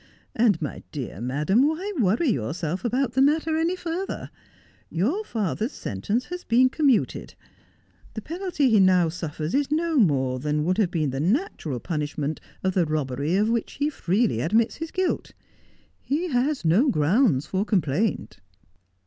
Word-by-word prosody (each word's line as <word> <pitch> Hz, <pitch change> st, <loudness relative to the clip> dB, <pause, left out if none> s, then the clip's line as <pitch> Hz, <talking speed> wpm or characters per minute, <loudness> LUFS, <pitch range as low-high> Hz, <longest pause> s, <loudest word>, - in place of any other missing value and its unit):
And, 220 Hz, -7 st, +3 dB
my 150 Hz, -, -5 dB
dear 125 Hz, -8 st, -6 dB
madam, 150 Hz, -, +2 dB
why 365 Hz, +7 st, -2 dB
worry 230 Hz, -, +2 dB
yourself 160 Hz, -, -2 dB
about 250 Hz, +1 st, 0 dB
the 265 Hz, -, +2 dB
matter 315 Hz, +3 st, +2 dB
any 330 Hz, +3 st, +1 dB
furtlier? 355 Hz, +2 st, -4 dB, 0.6 s
Your 260 Hz, -, 0 dB
father's 220 Hz, -, -2 dB
sentence 200 Hz, -, -2 dB
has 360 Hz, 0 st, -7 dB
been 250 Hz, +3 st, +4 dB
com 300 Hz, 0 st, +1 dB
muted 250 Hz, -6 st, +1 dB, 0.8 s
The 220 Hz, -, -5 dB
penalty 335 Hz, -6 st, 0 dB
he 215 Hz, -, +5 dB
now 185 Hz, -3 st, +4 dB
suffers 160 Hz, -1 st, -5 dB
is 280 Hz, 0 st, +1 dB
no 320 Hz, +1 st, 0 dB
more 135 Hz, -, +2 dB
than 150 Hz, +2 st, -1 dB
would 185 Hz, +6 st, 0 dB
have 200 Hz, -5 st, +3 dB
been 155 Hz, -6 st, -1 dB
the 135 Hz, -, -3 dB
natural 180 Hz, -, -1 dB
punishment 150 Hz, 0 st, -3 dB, 0.2 s
of 190 Hz, 0 st, +1 dB
the 180 Hz, -3 st, +2 dB
robbery 150 Hz, +1 st, -1 dB
of 210 Hz, +2 st, +2 dB
which 235 Hz, -1 st, -1 dB
he 295 Hz, +1 st, -1 dB
freely 195 Hz, -, 0 dB
admits 220 Hz, -, +1 dB
his 325 Hz, 0 st, -5 dB
guilt. 370 Hz, +1 st, -2 dB, 0.7 s
He 325 Hz, +6 st, -1 dB
has 265 Hz, -, 0 dB
no 205 Hz, -, +4 dB
ground 165 Hz, -, +3 dB
for 190 Hz, +3 st, -1 dB
complaint.' 175 Hz, -, -1 dB
210 Hz, 155 wpm, -25 LUFS, -, 0.8 s, he